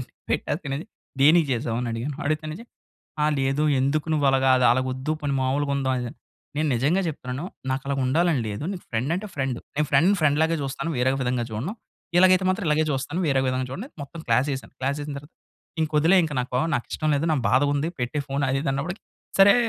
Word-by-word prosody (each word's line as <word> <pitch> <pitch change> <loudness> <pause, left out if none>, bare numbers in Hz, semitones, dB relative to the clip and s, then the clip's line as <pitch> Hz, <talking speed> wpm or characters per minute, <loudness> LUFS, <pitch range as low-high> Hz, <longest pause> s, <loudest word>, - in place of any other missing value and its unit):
అండీ. - - -6 0.2
పెట్టాకన్నాది 145 -1 -2 0.4
దేనికి 160 +2 +6
జేసావు? 115 -2 -1
అని, 120 - -2
అడిగాను. 130 +5 -3
అడిగితేనేంచి, 155 +7 -2 0.6
"ఆ! - - +4
లేదు 135 +3 +1 0.2
ఎందుకు 145 +4 0
నువ్వలాగా 135 -2 +3
అది 125 - +4
అలగొద్దు 130 +3 -1
పోని 140 -1 0
మామూలుగుందాం 140 0 0
అది 125 - -2
ఇది" 120 - -4
అని, - - -27 0.4
"నేను 155 -1 +1
నిజంగా 150 +10 +2
జెప్తున్నాను. 135 0 -5 0.3
నాకలాగా 135 +1 -2
ఉండాలని 160 -1 +2
లేదు. 105 +8 -4
నీకు 180 - -8
ఫ్రెండ్ 125 +8 0
అంటే 210 +3 -5
ఫ్రెండు. 135 -3 -1 0.2
నేను 150 0 +2
ఫ్రెండ్ 165 +9 +5
ఫ్రెండ్‌లాగే 160 +2 +3
జూస్తాను. 135 +4 -3
వేరే 130 +2 +3
విధంగా 125 -1 0
జూడను. 140 - -3 0.4
ఇలాగైతే 185 +1 +6
మాత్రం 190 +1 0
ఇలాగే 155 +1 +3
జూస్తాను. 140 +6 -2
వేరే 135 -1 +3
విధంగా 130 0 -1
జూడను" 195 - -5
అని - - -37
మొత్తం 165 +3 -9
క్లాస్ 125 +5 +3
యేశాను. 135 - -6
క్లాస్ 140 +3 -1
యేసిన 145 -1 -5
తర్వాత, 145 +4 -14 0.5
"ఇంకొదిలే 155 +4 +3
ఇంక. 155 - -4
నాకో 125 +1 -1
నాకిష్టం 155 +5 -2
లేదు 160 +4 -1
నాకు 135 -5 0
బాధగుంది. 145 +3 +2
పెట్టే 125 +5 -1
ఫోన్ 140 +1 -1
అది 135 - +1
ఇది" 135 - 0
అన్నప్పడికి, 170 +8 -3 0.4
"సరే" 195 +1 +8
140 Hz, 190 wpm, -25 LUFS, 130-155 Hz, 0.6 s, సరే